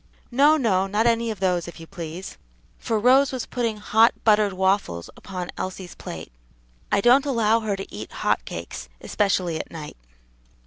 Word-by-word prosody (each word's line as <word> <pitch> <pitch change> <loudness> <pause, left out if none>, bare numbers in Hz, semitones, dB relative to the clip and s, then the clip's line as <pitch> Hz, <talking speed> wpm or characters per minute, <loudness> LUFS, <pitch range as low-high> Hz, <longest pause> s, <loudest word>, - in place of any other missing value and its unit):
"No, 290 +5 +5
no; 195 -8 +2
not 210 +3 +1
any 230 0 +2
of 215 -4 -4
those, 180 -3 0
if 170 - -10
you 165 - -9
please," 170 0 -8 0.4
for 225 - -1
Rose 255 +5 +5
was 255 -3 -3
putting 230 -3 -2
hot, 220 +2 +4
buttered 210 -2 +4
waffles 190 - 0
upon 180 -2 -6
Elsie's 185 -1 -5
plate; - - -8 0.6
"I - - +3
don't 260 +6 +5
allow 230 -4 +3
her 215 -3 -2
to 195 - -8
eat 105 +1 -7
hot - - 0
cakes, 85 -7 -7
especially 185 -5 0
at - - -6
night." 155 - -8
205 Hz, 170 wpm, -24 LUFS, 180-230 Hz, 0.6 s, No